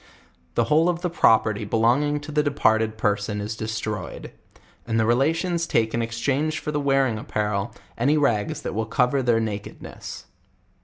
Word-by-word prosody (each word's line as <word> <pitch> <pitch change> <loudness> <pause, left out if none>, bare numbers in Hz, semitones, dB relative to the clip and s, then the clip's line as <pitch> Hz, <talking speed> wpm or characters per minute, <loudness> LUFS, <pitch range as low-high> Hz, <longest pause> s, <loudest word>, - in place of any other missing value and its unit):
The - - +3
whole 160 +3 +3
of 175 -1 -1
the 180 -2 -2
property 110 -8 +3
belonging 120 +8 +2
to 150 +1 -8
the 150 0 +2
departed 110 -7 +1
person 105 -1 -1
is 105 +1 -4
destroyed; 110 -1 -5 0.6
and 115 0 +1
the 110 - +3
relations 165 +8 +1
take 110 -1 +1
in 115 - 0
exchange 130 +7 -1
for 150 - -4
the 150 - -1
wearing 135 -5 +1
apparel, 105 0 -2 0.3
any 140 +6 +3
rags 115 -8 0
that - - -3
will 110 +2 -2
cover 125 +3 +2
their 120 -3 +2
nakedness. 105 -2 -6
115 Hz, 160 wpm, -24 LUFS, 110-145 Hz, 0.6 s, The